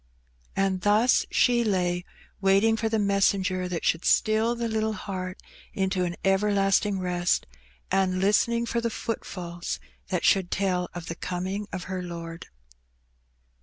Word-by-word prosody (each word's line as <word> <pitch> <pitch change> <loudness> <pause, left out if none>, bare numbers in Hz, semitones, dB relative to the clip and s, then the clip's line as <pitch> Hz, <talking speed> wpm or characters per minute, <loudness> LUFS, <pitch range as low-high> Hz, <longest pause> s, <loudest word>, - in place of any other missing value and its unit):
And 195 -1 +1
thus 215 +6 +3
she 240 -1 +3
lay 180 -4 0 0.4
waiting 195 +3 +4
for 225 0 -1
the 220 - +1
messenger 195 -2 +1
that 175 -2 -4
should 165 - +1
still 220 +2 +3
the 235 0 -2
little 220 -1 0
heart 185 -3 -5 0.4
into 190 -1 0
an 175 0 -3
everlasting 195 0 +2
rest, 180 -1 0 0.5
and 185 -1 +2
listening 235 +4 +2
for 235 0 -1
the 230 - 0
footfalls 180 -6 -5 0.3
that 180 -2 -1
should 190 -3 +3
tell 180 -3 0
of 175 -2 -6
the 165 - -4
coming 185 +4 -4
of 185 -1 -4
her 185 +1 -4
Lord. 170 -1 -7
195 Hz, 140 wpm, -26 LUFS, 180-210 Hz, 0.5 s, waiting